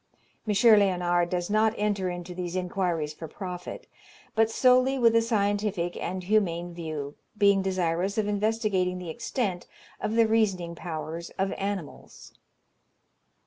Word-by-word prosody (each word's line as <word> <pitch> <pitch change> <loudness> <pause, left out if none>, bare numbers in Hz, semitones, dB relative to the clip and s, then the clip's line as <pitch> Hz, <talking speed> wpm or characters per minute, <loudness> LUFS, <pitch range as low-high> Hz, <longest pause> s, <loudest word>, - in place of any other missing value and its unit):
M. 210 - +1
Léonard 185 -5 +4
does 175 +2 -2
not 215 +1 +3
enter 205 -3 0
into 175 0 -6
these 175 0 -4
inquiries 175 -4 -1
for 160 +1 -8
profit, 180 +2 -7 0.5
but 220 0 +3
solely 255 +3 +4
with 230 -2 +4
a 230 - +6
scientific 205 -5 0
and 185 +1 -4
humane 175 -4 0
view, 155 -4 -5 0.2
being 200 -1 +4
desirous 185 +1 -1
of 215 -1 +1
investigating 205 -3 0
the 180 -3 -6
extent 220 -3 -3 0.3
of 215 - -2
the 230 -1 +5
reasoning 195 -6 +1
powers 165 0 -6
of 195 0 0
animals. 195 -6 -6
190 Hz, 135 wpm, -27 LUFS, 175-215 Hz, 0.5 s, a